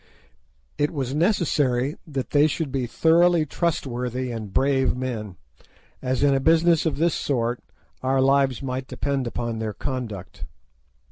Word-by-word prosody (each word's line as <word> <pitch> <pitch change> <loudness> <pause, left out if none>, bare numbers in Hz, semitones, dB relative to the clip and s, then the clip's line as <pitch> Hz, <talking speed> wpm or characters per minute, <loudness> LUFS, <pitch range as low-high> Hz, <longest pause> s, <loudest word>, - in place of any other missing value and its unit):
It 145 0 +2
was 135 -4 -3
necessary 150 - +1
that 135 -4 -4
they 145 +1 +5
should 155 -1 -3
be 130 -2 -1
thoroughly 165 +4 +4
trustworthy 130 -6 -2
and 110 -4 -6
brave 135 +1 +2
men, 115 -7 -4 0.7
as 130 +1 -1
in 140 -1 +4
a 135 - +2
business 165 +3 +3
of 160 - -1
this 165 +1 +2
sort 120 -3 -1 0.4
our 130 +1 +1
lives 135 -1 +2
might 130 0 -3
depend 140 -2 -2
upon 120 -1 -3
their 110 -1 -3
conduct. 115 -9 -5
135 Hz, 140 wpm, -24 LUFS, 125-150 Hz, 0.7 s, they